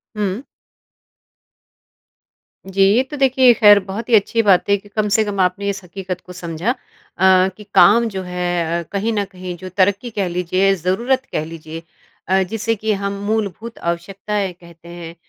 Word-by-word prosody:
हुँ। 205 +1 -2 2.2
जी, 195 0 -2
ये 250 - +3
तो 280 +3 -8
देखिए 260 -2 +5
खैर 210 -3 +7
बहुत 205 +4 -6
ही 235 - +6
अच्छी 220 +2 +2
बात 195 -2 +3
है 200 - +5
कि 205 +1 -17
कम 210 0 -1
से 220 - +4
कम 205 -2 -4
आपने 185 +2 0
इस 195 -1 -4
हकीकत 185 0 -6
को 180 - -12
समझा। 170 +4 -3
अ, - - -3 0.8
कि 210 - -11
काम 235 +2 +6
जो 190 -3 -5
है 175 -2 -2
अ, - - -5
कहीं 205 +3 -1
न 205 -1 0
कहीं 185 -1 -7
जो 185 +2 -8
तरक्की 200 +5 +2
कह 195 -2 +1
लीजिए 180 +2 +1
ज़रूरत 235 +10 0
कह 155 - -2
लीजिए 160 0 -9 0.5
अ, 190 +1 +3
जिसे 225 +4 -2
कि 215 +1 -1
हम 200 0 -1
मूलभूत 220 +1 -3
आवश्यकताएँ 195 +3 -3
कहते 170 -1 -17
हैं, 170 -1 -9
195 Hz, 175 wpm, -19 LUFS, 180-215 Hz, 2.2 s, खैर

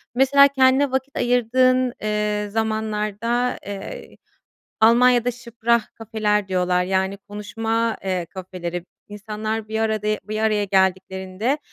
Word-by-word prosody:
Mesela, 280 +2 +6
kendine 265 0 +3
vakit 265 +1 -2
ayırdığın, 250 +1 +2
eee, 210 -1 -1
zamanlarda, 220 +2 -1
eee, 205 - -8 0.6
Almanya’da 245 +2 +5
"sprachcafeler" 225 -3 -1
diyorlar, 180 -1 +1
yani, 190 +1 0
konuşma, 225 +3 -2
eee, 185 -3 -1
kafeleri. 180 -2 -6 0.2
İnsanlar 215 +1 -4
bir 220 0 -2
arada 215 -1 -1 0.2
bir 215 0 -3
araya 215 -1 +1
geldiklerinde, 190 +5 0
220 Hz, 100 wpm, -22 LUFS, 200-240 Hz, 0.6 s, Mesela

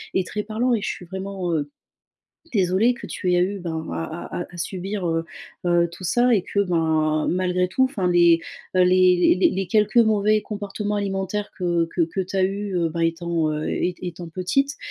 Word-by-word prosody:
est 190 - +2
très 210 +4 -3
parlant 230 +4 0
et 215 - -2
je - - -2
suis 180 - -6
vraiment, 190 0 -4
heu, 145 -2 -1 0.8
désolée 200 +4 +3
que - - -9
tu 180 -2 -1
aies 175 - +4
eu, 195 +2 -1
ben, 160 -3 -4
à 80 -1 -5 0.2
à - - -4
à - - -9
subir, 190 +3 -3
heu 165 0 -1 0.4
heu, 175 -1 +3
tout 185 +2 -8
ça 245 +7 +3
et 195 -5 +2
que, 200 - 0
ben, 160 -4 +1
malgré 180 0 +1
tout, 225 +8 +1
enfin, 245 -9 0
les, 170 -1 +5 0.4
heu, 185 - +5
les 180 -1 +5
les - - +4
les 190 0 -2
quelques 210 +4 +2
mauvais 215 -2 +4
comportements 205 0 -4
alimentaires 200 0 -2
que 175 -2 +1
que 175 - +2
que 170 +4 -2
tu 185 +1 -6
as 190 - +3
eu, 200 +1 -3
heu, 170 -1 +1
ben, 170 +1 -3
étant, 165 -1 0
heu, 150 0 -3
ét 180 0 -1
étant 175 -1 -6
petite, 225 - 0
185 Hz, 200 wpm, -23 LUFS, 170-205 Hz, 0.8 s, les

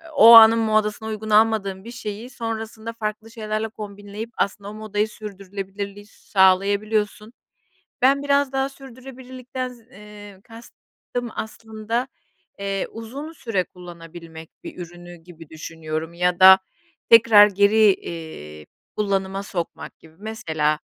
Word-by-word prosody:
o 230 -3 +9
anın 225 0 +9
modasına 215 0 0
uygun 215 0 -5
almadığım 210 -3 +2
bir 235 - -9
şeyi 225 0 -7
sonrasında 225 -1 -6
farklı 220 0 -5
şeylerle 215 -1 -3
kombinleyip 205 +1 -8
aslında 200 0 -2
o - - -9
modayı 215 0 -2
sürdürülebilirliği 200 -1 -8
sağlayabiliyorsun. 210 +3 +1 0.7
Ben 275 +2 +3
biraz 280 -1 +2
daha 270 0 -1
sürdürülebilirlikten 255 -1 -8
z 250 -1 -14
eee, 205 -4 -13
kastım 235 +1 -9
aslında, 220 +2 -4 0.5
eee, 195 -1 -2
uzun 255 +8 -8
süre 225 - -2
kullanabilmek 165 -2 -12
bir - - -9
ürünü 175 0 -10
gibi 165 -2 -15
düşünüyorum 160 0 -6
ya 180 0 0
da 190 0 +9 0.5
tekrar 225 -2 +8
geri, 205 +1 +4
iii, 75 - -9 0.3
kullanıma 195 -1 -1
sokmak 175 -4 -6
gibi. 160 -1 -19
Mesela, 160 -9 -2
210 Hz, 120 wpm, -22 LUFS, 190-225 Hz, 0.7 s, o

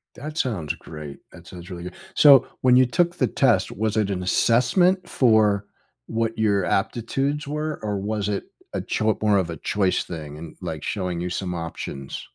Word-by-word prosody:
That 150 +4 -7
sounds 95 - -1
great, 75 -3 -9
that 85 -1 -14
sounds 90 -1 -10
really 85 -2 -7
good. 90 0 -7 0.2
So, 140 -4 +7
when 125 -1 +5
you 130 0 +6
took 175 +7 +1
the 130 - +1
test, - - +2
was 110 +1 -1
it 105 -2 +1
an 90 -2 -2
assessment 175 - +3
for 105 -5 +3 0.4
what 115 0 -2
your 100 -4 +2
aptitudes 135 - -1
were, 150 +1 -3
or 105 -1 -1
was 105 0 -2
it 100 - -2 0.3
a - - -1
choi 110 0 0
more 105 -2 +3
of 90 -3 0
a 80 - -5
choice 95 -3 0
thing 75 -3 -7
and, 80 0 -9
like, 80 -2 -5
showing 90 -4 -2
you 90 - -2
some 90 0 -3
options? 80 -5 -6
105 Hz, 185 wpm, -24 LUFS, 90-125 Hz, 0.4 s, So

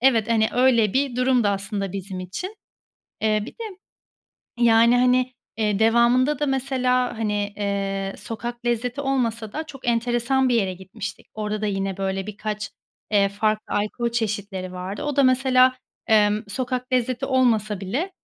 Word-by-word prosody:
evet, 235 -4 +3
hani, 220 -1 +3
öyle 240 -5 +4
bir 265 -2 0
durumdu 250 -4 +3
aslında 195 -1 -2
bizim 190 -1 -5
için. 355 - -6 0.7
Eee, 215 -1 +2
bir - - -8
de 465 - -9 1.0
yani, 235 +1 +5
hani, 255 0 +3 0.2
eee, 210 -2 +1
devamında 240 +5 +4
da 295 - +1
mesela 255 -2 0
hani, 205 -2 -1
eee, 195 -1 -2
sokak 235 +3 -6
lezzeti 240 +3 -1
olmasa 235 -6 -1
da 315 - -3
çok 270 -5 -11
enteresan 240 +3 +2
bir 245 - +3
yere 195 -5 +1
gitmiştik. 190 +3 -8
Orada 215 0 -3
da - - 0
yine 195 -2 -2
böyle 195 0 -2
birkaç, 210 -1 -4 0.4
eee, 200 -1 +4
farklı 215 +1 -1
alkol 215 +3 -1
çeşitleri 205 -5 -3
vardı. 185 +2 -5
O 295 -2 -2
da 280 - +4
mesela, 255 0 +4 0.3
emm, 210 -1 +4
sokak 255 +2 -3
lezzeti 255 +1 0
olmasa 225 -6 +2
bile, 270 - -2
225 Hz, 150 wpm, -23 LUFS, 205-255 Hz, 1.0 s, yani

